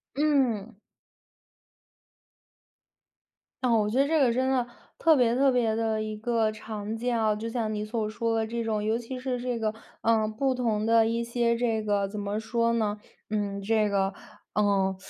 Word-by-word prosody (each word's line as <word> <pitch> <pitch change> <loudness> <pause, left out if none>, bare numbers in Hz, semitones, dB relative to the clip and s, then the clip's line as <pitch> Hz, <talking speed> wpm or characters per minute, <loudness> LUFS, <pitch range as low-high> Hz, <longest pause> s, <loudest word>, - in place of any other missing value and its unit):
嗯。 255 -8 +1 2.9
哦， 235 -3 +4
我 210 - +1
觉 240 +5 0
得 275 - +4
这 315 0 +2
个 250 -4 +4
真 260 +2 +1
的 255 -2 +1 0.3
特 325 -1 +5
别 240 -3 +3
特 270 +1 +4
别 235 -3 +1
地 220 -1 0
一 215 0 -4
个 225 -1 +1
常 215 0 -6
见 245 +1 -1
啊， 215 -1 +2
就 220 +2 -5
像 230 -2 -2
你 210 0 -3
所 215 -1 -2
说 230 +1 -1
的 220 0 0
这 235 +1 -3
种。 215 -2 -1
尤 220 +2 +1
其 245 +2 -6
是 255 -1 -2
这 245 -1 -2
个， 215 -1 0 0.3
呃， 220 -1 +2
不 260 +4 0
同 225 -4 0
的 225 0 +4
一 230 +1 0
些 235 0 +1
这 230 -2 0
个， 205 -1 +1
怎 205 +1 -6
么 205 +1 -2
说 230 +1 0
呢， 215 -2 0 0.3
嗯， 205 -2 -2
这 215 +1 +2
个， 195 -1 0 0.4
嗯， 195 -2 +2
225 Hz, 190 characters per minute, -27 LUFS, 215-240 Hz, 2.9 s, 特